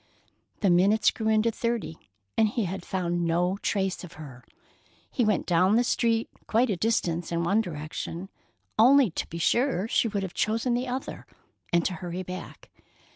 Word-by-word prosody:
The 195 -4 +4
minutes 195 +5 +4
grew 220 - -4
into 220 +1 +3
thirty, 225 - -3 0.3
and 220 - +4
he 215 0 -1
had 185 0 -4
found 175 -2 -1
no 175 +3 +1
trace 190 -2 -1
of 175 - -10
her. 135 -5 -11 0.7
He 250 - +1
went 210 -4 +1
down 185 +4 +3
the 240 - +4
street 230 -1 +1 0.2
quite 230 +1 +2
a - - +1
distance 175 -5 -1
in 170 0 0
one 200 +6 +3
direction, 165 +1 -6 0.5
only 255 -1 +6
to - - -4
be 170 - -7
sure 230 +3 +1
she 230 - +2
would 200 -2 -2
have 190 -1 -5
chosen 225 +3 0
the 245 +2 -1
other, 255 +2 -5 0.4
and 170 -1 +2
to 185 - 0
hurry 180 +1 -5
back. 180 -1 -9
195 Hz, 175 wpm, -27 LUFS, 175-225 Hz, 0.7 s, only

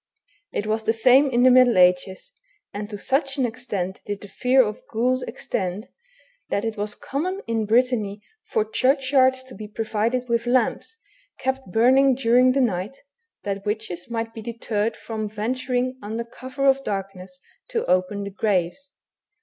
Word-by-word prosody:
It 205 - -2
was 220 +1 0
the 220 +1 +1
same 255 +5 +5
in 245 -1 +2
the 255 - +7
middle 250 -3 +6
ages, 180 - +2 0.4
and 205 +1 -5
to 205 - -6
such 270 +5 0
an 265 - +2
extent 200 -5 -4
did 205 -1 -4
the 205 - -9
fear 255 +5 +3
of 210 0 -5
ghouls 250 +3 +1
extend, 205 -4 -4 0.6
that 200 - -1
it 225 -1 -2
was 210 0 -2
common 360 +8 -3
in 225 -2 -1
Brittany 220 -3 +1 0.2
for 215 - 0
churchyards 260 +2 +2
to 260 -1 -12
be 210 +2 -8
provided 225 +3 -1
with 235 0 0
lamps, 255 - 0 0.4
kept 265 -6 -3
burning 260 +5 +4
during 250 +1 +4
the 275 - +2
night, 210 +2 -1 0.5
that 200 -1 -3
witches 210 -3 -4
might 225 -1 -3
be 225 - -8
deterred 225 -1 -2
from 220 -2 -5
venturing 250 +4 -2
under 220 +3 -4
cover 260 +4 -5
of 270 0 +4
darkness 195 -3 -5 0.3
to - - -1
open 185 +3 +1
the 200 - -6
graves. 200 +6 -1
230 Hz, 160 wpm, -23 LUFS, 205-255 Hz, 0.6 s, the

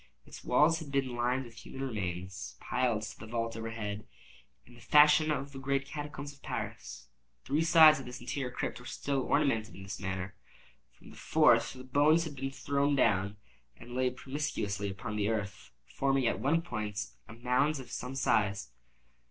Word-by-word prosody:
Its - - -11
walls 150 +6 +4
had 155 -4 -8
been 135 -3 0
lined 125 +2 0
with 115 -1 -14
human 135 - -7
remains, 95 -3 -5
piled 120 -4 0
to 110 - -7
the 110 - -9
vault 115 0 -2
overhead, 110 -2 -5 0.6
in 120 - -17
the 120 - -15
fashion 150 +1 +6
of 140 -2 -2
the 135 - -8
great 140 +1 0
catacombs 145 0 -6
of 140 - -22
Paris. - - -6 0.4
Three 145 +4 +1
sides 160 -2 +8
of 135 - -8
this 125 0 -7
interior 125 +2 -3
crypt 125 - -4
were 120 - -11
still 140 -1 -2
ornamented 125 -6 +1
in 95 - -10
this 95 0 -6
manner. 95 0 -4 0.6
From - - -15
the - - -14
fourth - - +4
the 130 -1 -10
bones 145 +5 +4
had 155 -3 -6
been 135 0 -3
thrown 140 +1 0
down, 100 -5 +2 0.4
and 120 - -12
lay 130 0 +2
promiscuously 125 -7 -3
upon 100 +2 -5
the 105 0 +1
earth, 105 -2 -3 0.2
forming 135 -1 0
at - - +1
one 160 +5 +2
point 105 - -4 0.2
a - - -10
mound 125 +5 +1
of 130 - -10
some 125 +1 -5
size. 105 -6 +1
125 Hz, 180 wpm, -31 LUFS, 110-140 Hz, 0.6 s, sides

